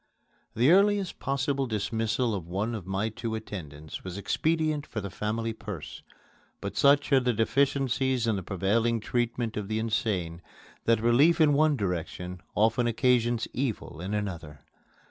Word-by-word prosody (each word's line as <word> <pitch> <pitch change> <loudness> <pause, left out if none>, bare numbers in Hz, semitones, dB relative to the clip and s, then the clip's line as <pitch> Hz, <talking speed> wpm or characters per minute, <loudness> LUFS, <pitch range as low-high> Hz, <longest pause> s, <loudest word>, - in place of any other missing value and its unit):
The 125 +7 +4
earliest 200 0 +3
possible 135 0 -1
dismissal 115 +2 -1
of 90 -5 -4
one 100 +6 -2
of 100 -6 -6
my 95 +3 -1
two 110 +1 -4
attendants 80 -9 -7
was 95 0 -6
expedient 155 +6 0
for 110 - -4
the 100 -2 -5
family 110 +3 -2
purse; 105 -8 -8 0.6
but - - -5
such 140 +1 +4
are 135 - +7
the 125 -1 +1
deficiencies 130 +1 +1
in 110 -2 +1
the 95 - -3
prevailing 105 +6 +1
treatment 120 0 -1
of 105 -2 -3
the 110 +1 -1
insane 100 -6 -1 0.4
that 115 -2 +3
relief 135 +10 +4
in 155 -2 +5
one 150 0 +3
direction 90 -2 -4
often 110 +3 +3
occasions 120 -1 +2
evil 115 - -3
in 95 +4 -3
another. 85 -8 -5
115 Hz, 150 wpm, -28 LUFS, 100-130 Hz, 0.6 s, are